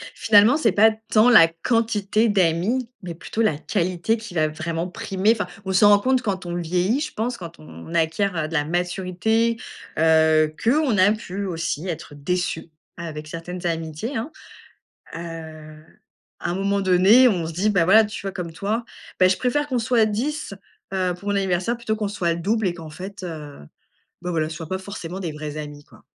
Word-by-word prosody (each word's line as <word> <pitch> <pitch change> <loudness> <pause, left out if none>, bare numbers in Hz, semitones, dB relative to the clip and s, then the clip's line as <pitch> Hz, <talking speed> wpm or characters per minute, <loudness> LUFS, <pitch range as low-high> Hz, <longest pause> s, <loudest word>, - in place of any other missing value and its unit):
Finalement, 220 +6 +5
c'est 225 -10 +2
pas 220 +3 +5 0.2
tant 220 +3 +6
la 215 -9 +8
quantité 215 +4 0
d'amis, 205 +6 +1
mais 175 -2 -5
plutôt 215 +6 -4
la 160 -10 +2
qualité 185 +5 -1
qui 225 -3 -10
va 155 -2 +2
vraiment 165 +2 -3
primer. 210 0 0
Enfin 210 -3 -3 0.2
on 190 - -2
s'en 205 +2 +6
rend 205 -1 +6
compte 255 +3 +1
quand 190 -5 -3
on 175 0 -4
vieillit, 180 - 0
je 305 - -4
pense, 235 +3 -2
quand 170 - -10
on 80 - -11
acquiert 165 0 0
de 165 - -9
la 150 -2 +1
maturité, 185 +7 0 0.4
heu, 160 -1 +4
qu'on 260 -1 +2
a 190 +2 +5
pu 200 -2 -4
aussi 170 -1 -3
être 160 -3 -6
déçu 175 +2 -2 0.3
avec 155 -3 -7
certaines 175 +3 -7
amitiés 165 - -3
hein. 240 +8 -4 0.9
Heu, 160 -2 -9 0.6
à - - -2
un 175 - -1
moment 200 +1 0
donné, 195 +7 +6
on 175 -7 -1
se 165 - -5
dit, 190 +6 0
bah 180 -5 +3
voilà, 215 +5 +6
tu 215 +2 -6
vois 195 -1 -4
comme 170 -3 -5
toi: 210 +7 -2 0.4
«Bah, 185 - +7
je 185 - +2
préfère 290 +4 0
qu'on 255 - 0
soit 230 -1 +2
10, 240 +2 -3 0.4
heu, 185 -1 0
pour 200 - -7
mon 205 - +1
anniversaire 190 +4 0
plutôt 220 -2 -2
qu'on 210 -2 -2
soit 180 -4 -1
le 170 - -5
double 220 +3 0
et 175 - 0
qu'en 165 -2 -9
fait, 195 +4 -9
heu, 155 -5 -7 0.6
bah 180 - -3
voilà, 155 -2 0
ce 160 - -7
soit 160 -1 -8
pas 190 - -1
forcément 190 -2 -7
des 175 -4 -4
vrais 150 0 -6
amis, 145 -1 -7
quoi». - - -20
185 Hz, 195 wpm, -23 LUFS, 165-220 Hz, 0.9 s, la